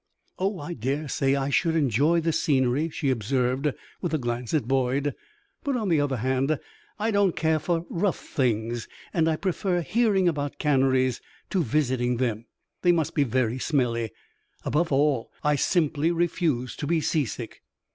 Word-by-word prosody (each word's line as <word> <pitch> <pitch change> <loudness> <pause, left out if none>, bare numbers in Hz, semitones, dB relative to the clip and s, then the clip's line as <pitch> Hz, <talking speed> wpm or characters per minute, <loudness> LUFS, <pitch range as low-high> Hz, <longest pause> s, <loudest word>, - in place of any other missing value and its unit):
"Oh, 195 +1 0
I 160 +2 -5
dare 140 +4 -2
say 135 -1 +1
I 140 0 -1
should 165 +3 +2
enjoy 150 +3 +3
the 165 +1 +1
scenery," 140 +1 +1
she 145 -3 -1
observed, 130 +4 0 0.3
with 170 -4 -1
a - - +2
glance 120 -2 -3
at 145 -7 0
Boyd; 135 +2 +1 0.5
"but, 280 -4 0
on 215 -5 -1
the 160 -4 +3
other 140 -3 0
hand, 130 +5 +1 0.4
I 220 +2 0
don't 200 -3 +2
care 160 -1 +2
for 165 +2 -1
rough 180 +1 0
things, 115 -2 -1 0.3
and 165 -2 +2
I 160 - +2
prefer 185 0 -1
hearing 205 -1 +2
about 145 -4 -1
canneries 130 -3 +2 0.3
to 190 - +2
visiting 125 -3 +1
them. 115 -2 -1 0.3
They 175 - +5
must 165 -4 0
be 145 - +3
very 125 -1 0
smelly. 120 -6 0 0.6
Above 165 +2 +1
all, 140 -3 +2
I 150 0 +3
simply 155 +1 +1
refuse 165 - 0
to 145 - -3
be 170 +1 +2
seasick." 140 -7 -2
145 Hz, 165 wpm, -26 LUFS, 130-165 Hz, 0.6 s, They